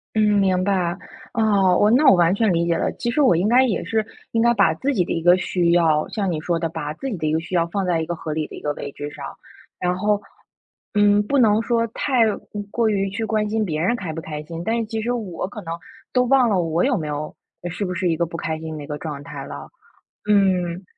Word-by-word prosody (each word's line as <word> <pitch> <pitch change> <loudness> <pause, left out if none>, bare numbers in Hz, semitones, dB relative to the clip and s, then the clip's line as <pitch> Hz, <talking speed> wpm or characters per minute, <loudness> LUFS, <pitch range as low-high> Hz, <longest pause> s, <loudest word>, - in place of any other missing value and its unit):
嗯， 210 -1 +3
明 185 -2 +2
白。 185 -2 0 0.4
哦， 200 -6 +3
我 210 - +4
那 265 +6 +4
我 195 - +8
完 175 0 +4
全 210 -1 +2
理 170 0 +1
解 170 -1 +1
了， - - 0
其 240 - -3
实 295 - +1
我 260 -10 +5
应 180 +6 +1
该 255 +2 +5
也 220 - -1
是 220 +4 0 0.3
应 225 - +1
该 235 +1 +4
把 195 -7 +3
自 275 - -1
己 185 -6 +2
的 - - -6
一 165 - -1
个 175 +2 +6
需 175 -1 0
要 160 -3 +3
像 195 -4 -2
你 155 - -2
说 170 +2 -1
的， 165 0 -2
把 150 -1 -5
自 270 +11 -5
己 205 - -4
的 155 - -2
一 155 - 0
个 160 - +2
需 180 +2 -10
要 170 -1 +2
放 195 +2 -2
在 175 -2 +1
一 - - -2
个 175 +1 -3
合 160 -1 -6
理 155 0 -2
的 - - -10
一 - - -10
个 150 - -1
位 - - -6
置 145 0 -6
上。 - - -8 0.5
然 180 0 0
后， 205 +1 +1 0.7
嗯， 205 0 +4
不 280 - +1
能 220 -3 +4
说 230 0 +1
太 250 +2 0 0.5
过 230 -1 +1
于 195 -2 0
去 220 +3 -3
关 215 -1 0
心 220 0 0
别 155 -3 -2
人 195 +8 +2
开 180 -8 -5
不 165 - -5
开 150 -2 -6
心， 165 +2 -7
但 225 +5 0
是 230 - -1
其 220 0 -4
实 240 - -1
我 215 -9 -3
可 210 - -8
能 165 -1 -4 0.4
都 250 -1 +4
忘 255 -1 +4
了 195 -4 +2
我 165 +1 0
有 260 -3 +2
没 155 -4 -4
有 150 +1 -4 0.3
是 180 +4 -4
不 180 -2 -2
是 180 0 -1
一 165 - +1
个 170 - 0
不 165 0 -7
开 160 0 -3
心 160 -1 -6
的 150 - -7
一 - - -15
个 150 - -4
状 150 -3 -6
态 145 -2 -8
了。 70 0 -8 0.6
嗯。 185 -3 +2
185 Hz, 285 characters per minute, -22 LUFS, 165-220 Hz, 0.7 s, 我